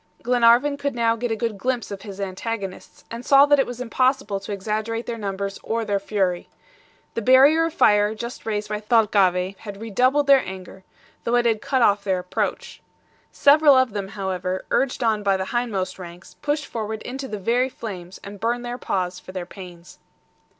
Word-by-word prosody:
Glenarvan 245 +4 +4
could 280 -2 -3
now 230 -1 +2
get 240 +1 -3
a 225 - 0
good 220 -2 -3
glimpse 250 -3 -2
of 195 -1 -6
his 200 -2 -9
antagonists, 195 0 -6
and 230 +1 -6
saw 275 +2 +6
that 290 -1 +4
it 270 - +2
was 245 0 -7
impossible 255 -3 0
to 200 +2 -8
exaggerate 215 +3 -3
their 235 - -4
numbers 200 -2 -4
or 230 0 -2
their 200 -1 0
fury. 195 -3 -1 0.6
The 230 - -2
barrier 275 +7 +6
of 330 - -3
fire 210 +1 +4
just 235 +2 -7
raised 210 -1 -2
by 210 0 -3
Thalcave 195 -4 +2
had 200 -2 -9
redoubled 255 +7 +1
their 275 -1 +5
anger, 190 0 -9 0.4
though 235 - 0
it 240 0 +2
had 225 -2 +1
cut 260 -3 +1
off 205 -2 +3
their 190 -2 0
approach. 180 0 -4 0.5
Several 290 0 +6
of 260 -2 +3
them, 200 -2 -3
however, 185 -2 -4
urged 265 -2 0
on 220 -2 +1
by 195 -1 +2
the 190 - -3
hindmost 220 -7 -2
ranks, 175 0 -11
pushed 295 0 -1
forward 220 -3 -5
into 265 +2 -6
the 210 - -5
very 240 +6 +1
flames, 190 -7 -8
and 200 0 -9
burned 240 +3 -1
their 240 +1 -5
paws 180 -1 -2
for 185 - -12
their 185 -2 -4
pains. 175 -2 -12
220 Hz, 190 wpm, -23 LUFS, 195-245 Hz, 0.6 s, saw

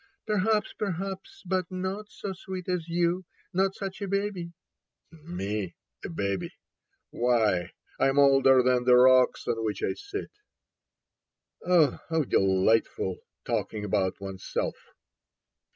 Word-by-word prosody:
" - - -57
Perfect, 215 0 +1
perhaps; 195 -1 -4
but 185 -1 -1
not 190 +3 -4
so 195 - -6
sweet 185 -1 -7
as 180 -3 -2
you. 175 +2 +1 0.3
Not 190 +1 +1
such 195 0 -6
a 200 - -2
baby." 195 -3 -2 0.4
" - - -49
Me? 110 - -4 0.3
A - - -5
baby. 100 +3 -3 0.6
Why, 110 -7 +1 0.3
I - - +4
am 135 - -1
older 135 -2 +6
than 125 -1 +3
the 125 0 +7
rocks 130 0 +5
on 115 -1 -1
which 105 -2 -2
I - - +1
sit... 405 0 -7 0.7
." - - -59
Oh, 170 -6 +3
how 160 -1 +2
delightful, 95 -3 +2 0.3
talking 105 -1 -2
about 95 -2 0
oneself 95 -1 -3
160 Hz, 135 wpm, -28 LUFS, -, 0.7 s, the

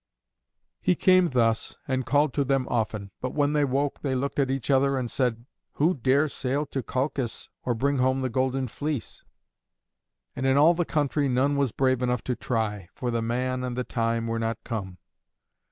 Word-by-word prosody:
He 180 - +3
came 185 +1 +5
thus, 115 -3 +1
and 130 -2 -1
called 145 0 +3
to 145 - +1
them 135 -1 0
often, 105 -3 -2
but 130 - -3
when 145 0 +2
they 150 -1 +3
woke 140 +1 -1
they 135 -2 -1
looked 140 +3 -2
at 135 -2 +2
each 135 0 -1
other 135 0 +3
and 125 -3 -2
said, 120 -3 0 0.3
"Who 160 +5 +2
dare 135 +2 +2
sail 140 +1 -2
to 135 - -1
Colchis 130 -1 -2 0.2
or 120 - +1
bring 140 +4 +1
home 130 +1 +2
the 130 - 0
Golden 130 +2 0
Fleece?" 145 +2 -4 1.1
And 130 - -1
in 135 +1 +4
all 155 +4 +6
the 175 0 0
country 145 -2 0
none 130 +3 +2
was 140 -4 +1
brave 130 0 +1
enough 125 -2 0
to 125 - -1
try, 105 -7 -2
for 125 -1 -2
the 115 -1 0
man 125 +2 -1
and 125 -1 -3
the 125 - 0
time 115 -1 -1
were 115 0 -2
not 115 0 -1
come. 95 -6 -5
130 Hz, 190 wpm, -26 LUFS, 120-140 Hz, 1.1 s, all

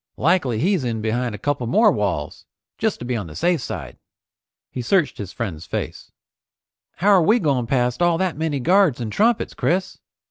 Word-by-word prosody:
Likely 150 -7 +2
he's 180 - +1
in 115 -3 -2
behind 115 +1 -1
a - - -7
couple 130 +1 -2
more 215 - +4
walls, 100 - -3 0.3
just - - 0
to 120 - -8
be 125 0 -2
on 105 -6 -4
the 75 - -11
safe 175 -3 +1
side." - - -7 0.7
He 125 - -4
searched 150 +1 +1
his 100 -3 -6
friend's 90 -9 -5
face. - - -5 0.8
"How 195 +5 +1
are 195 -3 +6
we 215 +9 +4
going 140 - 0
past 125 +2 0
all 175 -1 +3
that 185 -1 -1
many 155 -2 -2
guards 175 -1 +3
and 115 -3 -4
trumpets, 225 - +1
Chris? 185 +2 -1
140 Hz, 185 wpm, -22 LUFS, 115-180 Hz, 0.8 s, are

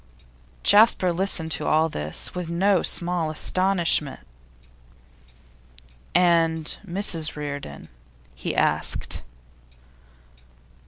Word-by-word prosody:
Jasper 205 -4 +5
listened 170 -3 -2
to - - -1
all 155 +1 +2
this 75 - -4
with 180 -2 -5
no 185 +2 +1
small 175 -2 0
astonishment. 170 - 0 1.9
'And 165 -3 +2
Mrs 175 -4 +2
Reardon?' 145 - -7 0.5
he 65 - -5
asked. - - -1
170 Hz, 75 wpm, -23 LUFS, 155-185 Hz, 1.9 s, Jasper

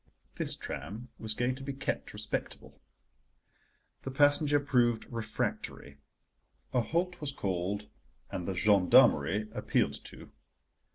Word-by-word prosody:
This - - -2
tram 105 - -6
was 110 -1 -2
going 125 +2 +1
to 130 - -9
be 140 0 -4
kept 135 - -3
respectable. - - -5 1.2
The - - -5
passenger 145 +2 +4
proved 120 -5 +2
refractory, 105 -10 -4 0.7
a 125 - +4
halt 175 +8 -1
was 145 -2 -2
called, 100 -2 -2 0.4
and 90 - -4
the 95 - -2
gendarmerie 100 +1 +5
appealed - - 0
to. - - -9
115 Hz, 115 wpm, -31 LUFS, 100-140 Hz, 1.2 s, gendarmerie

